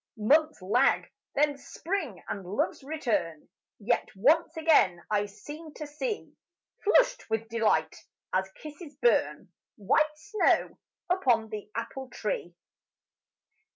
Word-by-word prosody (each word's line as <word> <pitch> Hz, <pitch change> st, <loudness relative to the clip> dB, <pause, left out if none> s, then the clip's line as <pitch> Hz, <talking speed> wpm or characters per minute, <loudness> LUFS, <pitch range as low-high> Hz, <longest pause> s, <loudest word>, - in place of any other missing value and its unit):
Months 305 Hz, +8 st, +3 dB
lag, 240 Hz, +8 st, +2 dB, 0.2 s
then 290 Hz, 0 st, +2 dB
spring 295 Hz, -, -4 dB
and 195 Hz, -, -4 dB
love's 190 Hz, +8 st, -2 dB
return 230 Hz, -, -2 dB, 0.3 s
Yet 235 Hz, +3 st, 0 dB
once 315 Hz, -, +3 dB
again 290 Hz, -, +4 dB
I 205 Hz, -1 st, +2 dB
seem 295 Hz, +9 st, -10 dB
to 305 Hz, -, -6 dB
see, 415 Hz, +10 st, -4 dB, 0.5 s
Flushed -, -, +3 dB
with 220 Hz, 0 st, -1 dB
delight, 225 Hz, -1 st, +1 dB, 0.4 s
as 190 Hz, +1 st, 0 dB
kisses 300 Hz, -1 st, -9 dB
burn, 480 Hz, -, +1 dB, 0.2 s
White 305 Hz, +9 st, +1 dB
snow 420 Hz, +6 st, +1 dB, 0.3 s
upon 245 Hz, -12 st, +2 dB
the 210 Hz, -1 st, -7 dB
apple 265 Hz, -1 st, -5 dB
tree. 185 Hz, -7 st, -4 dB
275 Hz, 115 wpm, -29 LUFS, 210-315 Hz, 0.5 s, again